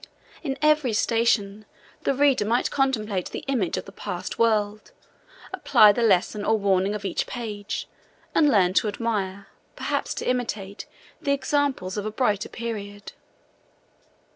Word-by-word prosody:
In 275 -4 -3
every 300 -6 +3
station, 215 -2 +1 0.4
the 275 - +2
reader 280 -4 +3
might 230 +4 +1
contemplate 215 -9 0
the - - -7
image 225 -11 0
of 185 - -4
the - - -11
past 195 -3 -6
world, 215 -2 +1 0.6
apply 215 -6 +6
the 220 - -2
lesson 205 -1 +2
or 220 +1 +2
warning 195 0 +1
of 205 -1 -6
each 190 - -1
page, 210 -4 -5 0.5
and 300 -2 +4
learn 185 -7 +3
to 215 - +2
admire, 200 -3 -3 0.3
perhaps - - -2
to - - -4
imitate, 220 -5 -3 0.3
the 280 -3 +1
examples 275 -9 -1
of 205 0 -2
a - - -3
brighter 210 -3 0
period. 205 -3 -6
215 Hz, 140 wpm, -25 LUFS, 200-245 Hz, 0.6 s, apply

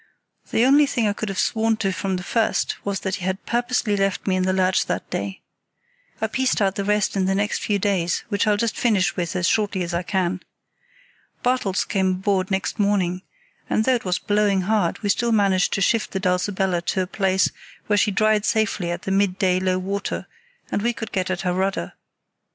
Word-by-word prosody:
The 230 - +3
only 285 +2 +5
thing 235 -5 0
I 205 - +1
could 215 0 -4
have 195 - -4
sworn 225 +1 +1
to 195 -3 0
from 185 +1 -2
the 180 - -4
first 225 +4 0
was 200 -1 -2
that 190 0 -2
he 185 - -9
had 190 +1 -3
purposely 240 -3 0
left 195 -1 0
me 190 - +1
in 185 - +1
the 185 - +2
lurch 185 0 +2
that - - -3
day. 190 +2 -4 0.8
I - - 0
pieced 260 -1 0
out 195 -2 +2
the 200 - -3
rest 210 0 +1
in 190 -1 +1
the 190 +1 +1
next 205 +2 0
few 205 - 0
days, 185 -4 0
which 205 0 0
I'll 210 -1 +3
just 225 +1 -1
finish 210 -6 +1
with 175 0 -3
as 180 -2 +1
shortly 205 -4 +1
as 170 0 -4
I 170 - 0
can. 185 -1 -1 1.0
Bartels 245 -6 +1
came 190 -2 +1
aboard 190 0 0
next 190 +3 -2
morning, 190 -3 +1 0.5
and 220 - +1
though 260 - +4
it 240 - -1
was 180 -1 0
blowing 205 -1 +1
hard 200 -2 +1
still 235 +4 +1
we 225 - +3
managed 195 -2 +2
to - - 0
shift 225 +3 +2
the 190 - -1
Dulcibella 185 -1 0
to 190 - +1
a - - -3
place 190 0 +1 0.3
where 210 - +1
she 210 - +3
dried 215 +1 +2
safely 215 -6 0
at 175 - -4
the 195 - -3
midday 190 -1 +2
low 185 0 +1
water, 195 +2 -3 0.5
and - - 0
we 240 +2 +1
could 220 -2 -7
get 185 -1 -1
at 185 0 -2
her 180 -1 0
rudder. 195 +3 -1
195 Hz, 215 wpm, -23 LUFS, 185-210 Hz, 1.0 s, only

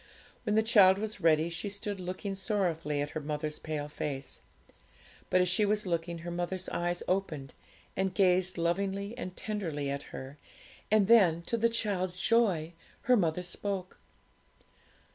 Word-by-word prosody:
When 210 -2 +1
the 220 - +4
child 200 -4 +6
was 215 -1 -4
ready, 160 0 +3
she 185 +5 -4
stood 200 0 -4
looking 185 +2 -4
sorrowfully 175 -7 -1
at 145 0 -3
her - - -3
mother's 150 0 -3
pale 150 -2 -4
face. 140 -2 -5 0.9
But 185 - +4
as 180 - +2
she 190 +5 +3
was 210 0 +1
looking, 170 -1 -2
her 175 - -3
mother's 175 +2 -3
eyes 175 0 -2
opened, 160 -8 -2 0.4
and 190 0 0
gazed 185 -1 +2
lovingly 195 +5 -1
and 185 -7 -6
tenderly 165 -10 -3
at 140 0 -3
her, 135 +2 -8 0.5
and 215 -2 +4
then, 185 -8 +5
to 235 - -1
the 230 0 +3
child's 185 -5 -1
joy, 195 -7 +2 0.3
her 255 -3 +5
mother 180 -4 +1
spoke. 185 +1 -4
185 Hz, 155 wpm, -31 LUFS, 165-200 Hz, 0.9 s, child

